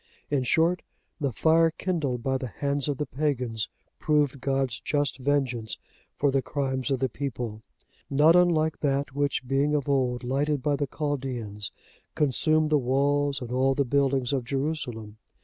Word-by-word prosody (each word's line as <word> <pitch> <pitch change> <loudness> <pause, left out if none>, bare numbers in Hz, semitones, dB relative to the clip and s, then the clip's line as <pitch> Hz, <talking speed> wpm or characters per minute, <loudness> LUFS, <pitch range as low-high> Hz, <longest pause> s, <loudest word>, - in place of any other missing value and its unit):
In 140 -2 +2
short, 165 +7 +2 0.4
the 140 -4 0
fire 165 +8 +4
kindled 155 -8 -2
by 135 0 0
the 130 - -4
hands 140 +4 -1
of 145 -2 -1
the 150 - -1
pagans, 125 -6 -1 0.3
proved 145 -3 +1
God's 135 -3 0
just 145 -2 -1
vengeance 130 -5 -1 0.4
for 140 -1 +2
the 135 0 +2
crimes 130 0 -2
of 135 - +2
the 130 +1 +1
people; 120 -4 -5 0.5
not 150 +4 +5
unlike 160 -3 +3
that 140 -1 0
which, 140 -2 -1
being 140 +3 +2
of 145 -1 -1
old 125 -3 +1
lighted 140 +2 0
by 145 -1 +2
the 145 0 -1
Chaldeans, 125 -10 -3 0.4
consumed 155 +2 +2
the 150 - +5
walls 140 +2 +1
and 120 -1 -6
all 130 +1 +2
the 140 - +1
buildings 135 0 +1
of 130 -3 0
Jerusalem. 125 -6 -3
140 Hz, 160 wpm, -27 LUFS, 130-145 Hz, 0.5 s, not